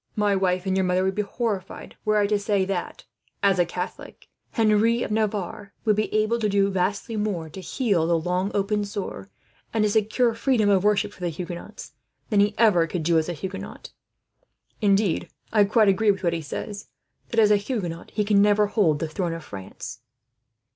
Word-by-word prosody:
My 205 -1 +2
wife 185 -1 0
and 190 -1 0
your 190 - +2
mother 180 0 +1
would 190 0 +1
be 210 - 0
horrified 205 -2 -4
were 215 0 +3
I 205 - +3
to 205 0 +1
say 200 -2 +1
that, 185 -2 -4 0.4
as 195 -2 +3
a 175 - +3
Catholic, 180 +1 -7 0.2
Henry 225 +2 +2
of - - -4
Navarre 210 -2 -2
would 215 -2 +4
be 215 +1 -1
able 215 +2 +1
to 215 -2 +1
do 200 0 +2
vastly 195 +4 -1
more, 195 -7 -2
to 190 - -9
heal 190 -4 0
the 170 0 +3
long 180 +4 -1
open 205 +1 +1
sore 200 - -6 0.4
and 220 -2 +1
to 210 - +3
secure 220 +3 +2
freedom 230 -2 +2
of 195 -2 +3
worship 210 -1 +2
for - - -18
the 175 -1 -1
Huguenots, 170 +1 -8 0.4
than 210 - +3
he 205 +1 +3
ever 200 -7 +4
could 165 0 -3
do 165 0 +3
as 160 - -3
a - - -2
Huguenot. 190 +4 -7 0.9
Indeed, 200 -3 +2 0.2
I 210 -2 +5
quite 215 +1 +3
agree 200 +2 +3
with 195 -1 +1
what 170 -1 +1
he 165 - -2
says, 200 +7 -6 0.4
that 230 - 0
as 210 -1 +5
a - - +7
Huguenot 200 -6 -4
he 210 - -1
can 205 -1 +4
never 210 0 +4
hold 200 -7 +2
the 165 - -3
throne 170 +1 -2
of 165 -1 -7
France." 100 +2 -9
200 Hz, 200 wpm, -24 LUFS, 180-210 Hz, 0.9 s, a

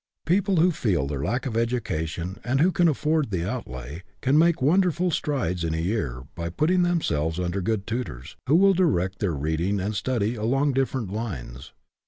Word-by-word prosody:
People 190 +3 +2
who 175 +2 +4
feel 95 - 0
their 70 -1 -3
lack 125 - -1
of 120 -4 -3
education, 95 -7 -2
and 130 +2 0
who 175 +5 +4
can 175 -1 +3
afford 155 -1 +1
the 90 -3 -2
outlay, 75 - -6 0.2
can 135 +3 +1
make 165 +1 +4
wonderful 180 +4 +2
strides 95 - -1
in 80 -1 -1
a - - -2
year 80 - -2
by 85 0 -4
putting 165 - +2
themselves 90 - 0
under 90 +2 -1
good 100 +1 -1
tutors, 85 - -5
who 145 - +4
will 195 +2 +6
direct 95 - +1
their 90 -7 0
reading 80 +7 -1
and 100 +3 -2
study 115 -1 0
along 135 +6 +1
different 130 -6 -1
lines. 70 - -6
110 Hz, 180 wpm, -25 LUFS, -, 0.2 s, will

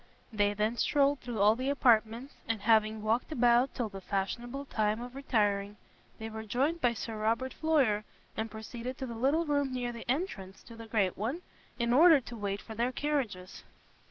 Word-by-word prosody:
They 205 -1 +1
then 215 +3 0
strolled 285 +1 +2
through 240 -3 -5
all 210 +2 +6
the 260 +3 -2
apartments, 235 -1 +2
and 225 -3 -1
having 220 -1 +3
walked 225 +7 0
about 245 -1 +3
till 240 - -1
the 195 -2 -9
fashionable 240 +8 -3
time 215 -4 0
of 245 +1 -7
retiring, 210 -6 0 0.4
they 220 - -6
were 220 0 -6
joined 270 +10 -1
by 240 -1 +2
Sir 225 0 -5
Robert 230 +4 0
Floyer, 270 -10 +2 0.3
and 220 +1 -3
proceeded 235 +4 -7
to 265 - -4
the 235 - -6
little 275 +8 +1
room 285 -3 0
near 245 -1 -2
the 235 0 -10
entrance 225 - -3
to 230 - -12
the 230 0 -10
great 205 -5 +1
one, 255 - -3 0.3
in 235 -1 +1
order 320 +2 +7
to 240 -2 -9
wait 200 -2 -3
for 225 - -9
their 235 +3 0
carriages. 250 -11 -3
235 Hz, 185 wpm, -31 LUFS, 215-265 Hz, 0.4 s, order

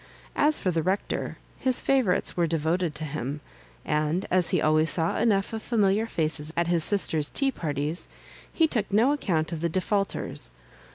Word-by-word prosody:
As 300 +1 +4
for 185 - -1
the 165 -1 0
Rec 190 +5 -1
tor, - - -3 0.2
his 260 -1 +2
favourites 260 -9 +1
were 170 -1 +1
devoted 165 +1 -1
to 155 - -5
him; 145 -1 -4 0.5
and 155 +4 0
as 180 -2 +3
he 185 - +2
always 155 +1 +2
saw 165 +2 +2
enough 210 -2 +1
of 220 - -3
familiar 215 -1 +1
faces 155 -4 -1
at 170 - +2
his 170 -1 +1
sister's 160 -7 +1
tea 275 -1 +1
parties, 150 - -3 0.4
he 325 - +3
took 220 -10 -2
no 225 +7 +4
account 170 - -1
of 165 -2 -4
the 170 - 0
defaulters. 195 - -2
175 Hz, 175 wpm, -26 LUFS, 155-210 Hz, 0.5 s, As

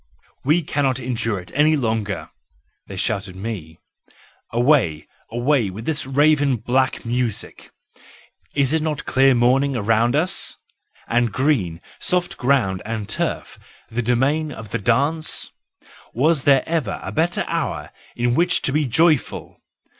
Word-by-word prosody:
"We 155 +5 +2
cannot 135 -3 0
endure 115 -4 -2
it 90 - -12
any 150 +3 +4
longer," 110 -7 -2 0.6
they 100 - -8
shout 100 +2 -1
to 95 - -9
me, 95 -7 -6 0.7
"away, 120 - +2 0.2
away 120 -1 +1
with 105 +5 -8
this 155 -4 0
raven 145 0 +3
black 130 +3 0
music. 120 -2 -3 0.9
Is 140 0 +2
it 160 - +2
not 155 -2 -3
clear 135 0 +4
morning 130 +4 +3
round 115 +2 +2
about 150 - +4
us? 185 +2 +1 0.5
And 120 -1 +1
green, 105 - 0 0.2
soft 180 -1 +1
ground 120 -8 +1
and 110 -1 -4
turf, - - -3 0.3
the 120 +2 -1
domain 135 +6 +1
of 110 -6 -9
the 115 - -1
dance? 140 +10 0 0.6
Was 145 +3 +2
there 135 -2 +5
ever 160 -11 -1
a 95 - -5
better 165 - 0
hour - - -3 0.2
in 120 0 +1
which 175 +6 +2
to - - +1
be 150 +1 +1
joyful? 155 +3 +1
125 Hz, 140 wpm, -21 LUFS, 115-145 Hz, 0.9 s, there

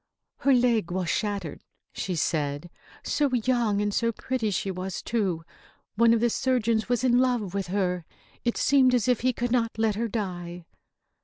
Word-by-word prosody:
"Her 275 - +2
leg 235 -7 +2
was 180 -1 -2
shattered," 200 -7 -3 0.3
she 185 - -3
said. 150 0 -1 0.3
"So 290 -2 +1
young 235 -3 +1
and 205 0 -1
so 230 +2 +1
pretty 230 -1 -2
she 195 0 -1
was, 185 0 -4
too! 195 -8 -1 0.5
One 230 +1 +4
of 230 -1 +3
the 240 -1 +2
surgeons 230 -4 0
was 245 0 +1
in 245 -1 +4
love 245 -7 0
with 195 -2 -2
her. 180 -2 -1 0.4
It 235 - 0
seemed 260 -2 +4
as 240 -2 +1
if 250 -3 +3
he 255 +2 +2
could 245 0 -3
not 230 -3 0
let 220 -1 +2
her 230 +3 -2
die." 180 -5 -5
220 Hz, 175 wpm, -26 LUFS, 185-245 Hz, 0.5 s, One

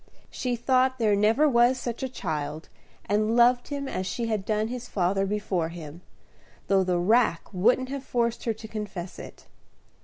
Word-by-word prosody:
She 250 -1 -2
thought 260 +2 +2
there 215 -4 +2
never 220 +9 +3
was 245 -1 +4
such 240 -2 -4
a 265 - -2
child, 155 - -4 0.4
and 215 +3 +1
loved 245 +1 +4
him 280 -1 -4
as 185 -7 -3
she 230 +5 -2
had 215 -4 -2
done 215 0 0
his 245 +1 -6
father 195 +1 0
before 195 -5 -1
him, 165 -1 -9 0.6
though 195 -1 +3
the 180 -1 0
rack 210 0 +3
wouldn't 245 +7 +2
have 275 -1 -5
forced 235 -3 -1
her 230 - +1
to 220 0 -10
confess 200 -5 -6
it. - - -11
220 Hz, 175 wpm, -26 LUFS, 190-245 Hz, 0.6 s, was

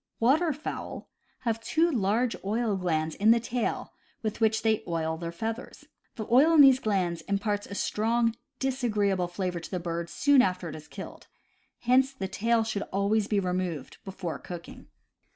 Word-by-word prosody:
Waterfowl 300 +5 0 0.3
have 225 -2 -1
two 325 +8 +2
large 230 0 +1
oil 215 +1 0
glands 160 -4 -1
in 205 +6 +2
the 230 +1 +6
tail, 235 +1 -3 0.3
with 215 +1 -3
which 220 0 +2
they 220 -1 +2
oil 160 -1 -1
their 170 +1 -5
feathers. 225 +7 -5 0.3
The 220 - -4
oil 285 +7 +6
in 305 - +9
these 270 -2 +7
glands 185 -7 0
imparts 205 +1 -1
a 200 - -7
strong, 230 +3 +1 0.2
disagreeable 210 -9 0
flavor 180 0 -3
to 170 - -9
the 185 - -2
bird 170 0 -4
soon 285 -2 +4
after 180 -6 -1
it 155 - -7
is 155 -1 -11
killed. - - -9 0.5
Hence 260 +2 +3
the 195 -8 -4
tail 225 +4 +1
should 220 -2 -2
always 200 +2 +1
be 210 -2 +1
removed 180 -5 -3
before 185 -4 -5
cooking. 175 -1 -9
210 Hz, 165 wpm, -28 LUFS, 180-235 Hz, 0.5 s, in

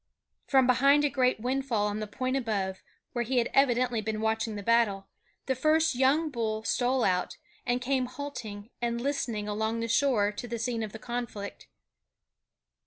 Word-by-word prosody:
From 265 -2 +5
behind 275 +4 +5
a 290 - +1
great 255 -4 +2
windfall 250 -3 0
on 210 0 -2
the 215 - -4
point 255 +5 -2
above, 200 -7 -2 0.3
where 240 - 0
he 250 +2 -1
had 235 -1 +1
evidently 245 -3 +3
been 215 0 -3
watching 220 0 -1
the 205 - -5
battle, 220 -3 +2 0.4
the 265 - +1
first 310 +4 +3
young 275 +5 +2
bull 220 -3 -2
stole 250 +2 +1
out, 180 -1 0 0.3
and 245 +1 +1
came 260 -1 +1
halting 245 -5 -7
and 235 0 -1
listening 235 -5 -2
along 220 +2 -1
the 230 - -2
shore 230 -4 +2
to 225 +3 -7
the 235 0 -3
scene 230 0 -2
of 215 -2 -4
the 220 - -7
conflict. 235 -3 -5
235 Hz, 175 wpm, -29 LUFS, 215-260 Hz, 0.4 s, From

